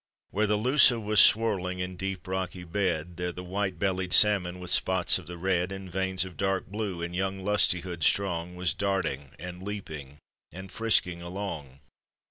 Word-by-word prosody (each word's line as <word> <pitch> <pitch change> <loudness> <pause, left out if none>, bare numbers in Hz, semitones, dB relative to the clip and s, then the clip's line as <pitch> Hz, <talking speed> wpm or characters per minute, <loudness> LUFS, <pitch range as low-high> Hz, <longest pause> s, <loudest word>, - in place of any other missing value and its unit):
Where 105 +2 +1
the 105 0 +1
Lussa 125 +1 +5
was 105 -1 +1
swirling 100 -5 +3
in 90 0 -4
deep 95 0 -5
rocky 95 -1 -4
bed, 90 -2 -2
There 90 0 -2
the 90 +1 -8
white 95 0 -3
bellied 95 0 -1
salmon, 95 -4 +5
with 90 -1 -2
spots 95 -1 +2
of - - -14
the 90 0 -7
red 90 0 0
And 95 -1 -8
veins 95 0 0
of 90 -4 -11
dark 95 +1 -1
blue, 100 -4 -4
in 85 0 -5
young 95 +1 -2
lustihood 90 -4 +1
strong 90 -2 0
Was 90 -2 -1
darting 95 -9 -2
and 90 +3 -8
leaping 80 -9 -7 0.3
and 95 +3 -10
frisking 90 -6 +1
along! 85 -7 -7
95 Hz, 170 wpm, -27 LUFS, 90-100 Hz, 0.3 s, Lussa